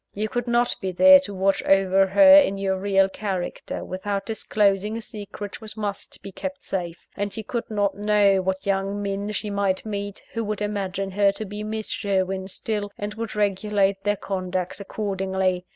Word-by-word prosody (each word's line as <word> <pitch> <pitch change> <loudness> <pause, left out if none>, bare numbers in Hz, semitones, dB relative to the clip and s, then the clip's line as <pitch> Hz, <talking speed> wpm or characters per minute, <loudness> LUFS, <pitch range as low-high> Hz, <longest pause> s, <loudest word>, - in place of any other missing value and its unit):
You 215 +1 -2
could 245 +1 -2
not 240 0 +2
be 190 - -2
there 280 +9 +8
to 275 -7 -7
watch 195 +1 +2
over 195 0 +4
her 285 +8 +7
in 280 -10 +6
your 195 -1 0
real 195 0 +3
character, 190 -2 -4
without 195 +2 -3
disclosing 210 -1 +1
a - - -5
secret 205 0 -8
which 220 0 -9
must 205 -2 -5
be 195 - -7
kept 280 +8 -6
safe; 175 -3 -4
and 205 +2 -3
you 220 - -4
could 235 +2 -4
not 205 -2 +1
know 205 -2 +3
what 190 0 -2
young 195 +1 0
men 200 +1 -3
she 210 0 -3
might 200 -1 0
meet, 205 -1 -5
who 230 - -2
would 210 -1 -3
imagine 195 -2 -2
her 200 +1 +3
to 215 - -6
be 205 +1 -6
Miss 215 0 -4
Sherwin 190 -2 -1
still, 205 +1 -3
and 205 +1 -4
would 225 0 -5
regulate 200 -1 +1
their 205 0 +1
conduct 185 -1 -3
accordingly. 190 -3 -2
200 Hz, 185 wpm, -24 LUFS, 195-210 Hz, -, there